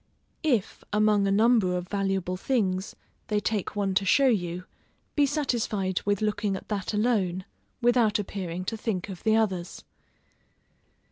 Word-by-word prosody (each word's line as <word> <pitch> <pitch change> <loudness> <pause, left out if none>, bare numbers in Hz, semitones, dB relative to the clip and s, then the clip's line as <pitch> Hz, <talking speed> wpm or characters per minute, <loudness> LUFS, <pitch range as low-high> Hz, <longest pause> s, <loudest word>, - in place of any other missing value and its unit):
If, 250 - 0
among 210 -1 +3
a - - +2
number 210 -3 +4
of 180 0 -5
valuable 195 -2 -1
things, 190 -3 -1 0.3
they 210 -1 +1
take 210 -1 -2
one 200 -2 0
to 195 - +2
show 275 +8 +4
you, 180 -5 -1 0.5
be 290 -1 +4
satisfied 230 - -1
with 205 0 +1
looking 210 -1 0
at - - -9
that 200 -3 -2
alone, 205 -5 0 0.4
without 240 -3 +4
appearing 185 -3 -4
to 225 - -3
think 205 -3 -3
of 185 -3 -7
the 220 0 +3
others. 190 -6 -1
205 Hz, 145 wpm, -27 LUFS, 185-220 Hz, 0.5 s, number